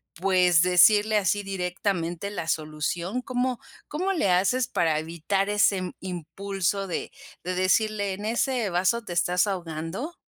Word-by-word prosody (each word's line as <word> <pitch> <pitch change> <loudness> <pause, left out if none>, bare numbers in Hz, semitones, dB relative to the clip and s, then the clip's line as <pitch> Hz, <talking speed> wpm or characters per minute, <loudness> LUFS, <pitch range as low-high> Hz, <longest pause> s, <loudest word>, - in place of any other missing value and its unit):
pues, 180 -2 +3
decirle 205 +4 +5
así 205 0 +1
directamente 180 -1 -2
la 165 -5 -4
solución?, 160 +8 -2
¿cómo 250 0 -2 0.3
cómo 370 +6 -1
le 315 - +1
haces 200 +8 +2
para 165 -5 +1
evitar 170 +5 -1
ese 195 -3 +1
impulso 195 +2 -3
de 175 - -4 0.3
de 185 0 -2
decirle: 200 +2 +1
"En 205 +2 -7
ese 235 0 0
vaso 190 +6 +1
te 175 - -5
estás 180 +2 +2
ahogando"? 180 - -5
190 Hz, 135 wpm, -26 LUFS, 175-210 Hz, 0.3 s, decirle